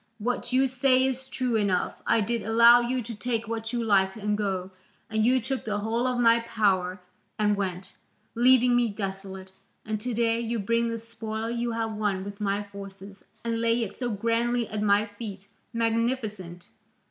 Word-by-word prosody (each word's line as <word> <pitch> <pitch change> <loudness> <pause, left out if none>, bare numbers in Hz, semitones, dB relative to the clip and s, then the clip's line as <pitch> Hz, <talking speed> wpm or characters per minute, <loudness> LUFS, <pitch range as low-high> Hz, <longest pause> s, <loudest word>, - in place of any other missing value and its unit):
What 240 +2 -2
you 265 +1 +4
say 260 0 +3
is 265 0 -2
true 250 -2 -1
enough: 200 -4 0
I 230 - +4
did 230 +3 -1
allow 235 +2 +7
you 245 +1 -1
to 230 - -6
take 230 0 -2
what 225 0 -4
you 240 -1 -1
liked 195 -3 +3
and 210 0 -1
go, 190 -3 -2 0.4
and 220 0 +1
you 255 +3 +4
took 260 +3 -3
the 210 -1 -2
whole 225 +4 0
of 250 -1 -1
my 230 -1 +5
power 195 -5 0 0.4
and 210 -1 +2
went, 190 -2 -4 0.4
leaving 250 0 +5
me 240 -1 +3
desolate, 195 -2 -6 0.3
and 215 -1 -2
to 245 0 -2
day 230 0 +2
you 235 0 -2
bring 230 +3 +1
the 230 - -2
spoil 225 0 -5
you 235 0 -2
have 225 -1 -2
won 205 -3 -1
with 200 +1 -8
my 200 0 0
forces, 200 0 -11 0.2
and 230 0 -1
lay 230 0 +2
it 210 - -6
so 245 -2 -2
grandly 230 +2 0
at 210 -1 -3
my 205 0 +3
feet 205 -2 -8 0.2
magnificent! 225 -6 -2
225 Hz, 180 wpm, -27 LUFS, 205-235 Hz, 0.4 s, allow